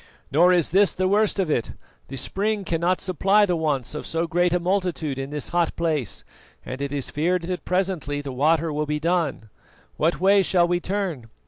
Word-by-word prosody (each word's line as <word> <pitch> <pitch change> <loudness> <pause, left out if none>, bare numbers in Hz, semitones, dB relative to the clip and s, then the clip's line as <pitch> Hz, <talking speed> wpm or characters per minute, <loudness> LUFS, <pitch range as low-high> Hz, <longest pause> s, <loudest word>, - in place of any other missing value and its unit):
Nor 175 +5 +5
is 175 -3 +2
this 195 +2 +4
the 185 0 0
worst 210 +2 +2
of 185 -5 0
it: 120 - -1 0.3
the 135 - -7
spring 200 - -1
cannot 170 +2 0
supply 195 +3 +3
the 180 -3 0
wants 145 -6 -1
of 150 - -5
so 165 +1 -1
great 175 +1 +1
a 180 - +2
multitude 175 -6 -1
in 135 0 -4
this 145 -5 -4
hot 170 0 0
place, 155 - -1 0.4
and 130 +2 -6
it 140 -1 -3
is 140 -2 -3
feared 170 +4 0
that 180 +1 -4
presently 180 -6 -1
the 145 -1 -6
water 155 +4 +1
will 150 0 -2
be 150 0 -1
done. 160 - -1 0.5
What 165 +3 +1
way 195 +2 +5
shall 180 -2 +2
we 175 0 +1
turn? 180 - -3
170 Hz, 200 wpm, -24 LUFS, 150-185 Hz, 0.5 s, Nor